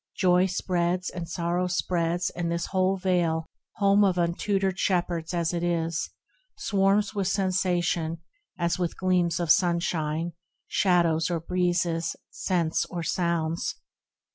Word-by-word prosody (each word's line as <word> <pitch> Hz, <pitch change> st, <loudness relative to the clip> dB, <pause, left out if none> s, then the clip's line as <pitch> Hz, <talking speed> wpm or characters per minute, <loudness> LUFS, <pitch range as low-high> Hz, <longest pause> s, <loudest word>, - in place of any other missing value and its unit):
Joy 180 Hz, 0 st, +4 dB
spreads, 180 Hz, -1 st, -1 dB
and 170 Hz, -2 st, -6 dB
sorrow 175 Hz, +1 st, -1 dB
spreads; 175 Hz, -1 st, 0 dB
and 170 Hz, -1 st, -3 dB
this 170 Hz, 0 st, -1 dB
whole 190 Hz, 0 st, +2 dB
Vale, 175 Hz, -4 st, +1 dB, 0.3 s
Home 200 Hz, -1 st, +4 dB
of 190 Hz, -3 st, +2 dB
untutored 190 Hz, +2 st, 0 dB
shepherds 175 Hz, -3 st, 0 dB
as 170 Hz, -1 st, 0 dB
it 170 Hz, -, -1 dB
is, 165 Hz, -1 st, -1 dB, 0.5 s
Swarms 200 Hz, +1 st, +2 dB
with 200 Hz, -3 st, -1 dB
sensation, 180 Hz, -4 st, 0 dB, 0.4 s
as 170 Hz, +1 st, 0 dB
with 175 Hz, -2 st, -2 dB
gleams 180 Hz, -3 st, +1 dB
of 170 Hz, -2 st, +2 dB
sunshine, 170 Hz, -3 st, +1 dB, 0.4 s
Shadows 170 Hz, -4 st, +2 dB
or 170 Hz, -2 st, -1 dB
breezes, 170 Hz, -1 st, 0 dB, 0.2 s
scents 170 Hz, -3 st, 0 dB
or 175 Hz, -2 st, -4 dB
sounds. 170 Hz, -1 st, -1 dB
175 Hz, 125 wpm, -26 LUFS, 170-185 Hz, 0.5 s, Joy